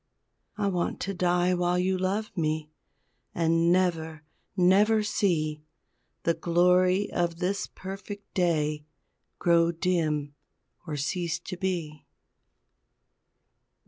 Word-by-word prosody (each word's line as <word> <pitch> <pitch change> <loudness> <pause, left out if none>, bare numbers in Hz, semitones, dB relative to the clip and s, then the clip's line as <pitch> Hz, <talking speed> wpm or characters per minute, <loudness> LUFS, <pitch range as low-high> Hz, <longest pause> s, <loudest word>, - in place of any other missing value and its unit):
I 210 - -1
want 180 -3 -1
to 195 - -2
die 180 0 +2
while 175 0 +1
you 185 +1 +1
love 195 +3 -2
me 155 -2 -1 0.6
And 165 0 +2
never, 165 -3 0 0.3
never 205 +4 +4
see 155 -7 0 0.6
The 170 - +2
glory 180 +3 +3
of 170 -1 -1
this 190 +3 -1
perfect 195 +2 -9
day 155 -4 0 0.5
Grow 170 -1 +3
dim 160 -5 -1 0.5
or 150 -2 -3
cease 170 +3 -1
to 180 - -6
be. 175 -5 -4
175 Hz, 105 wpm, -27 LUFS, 160-185 Hz, 0.6 s, never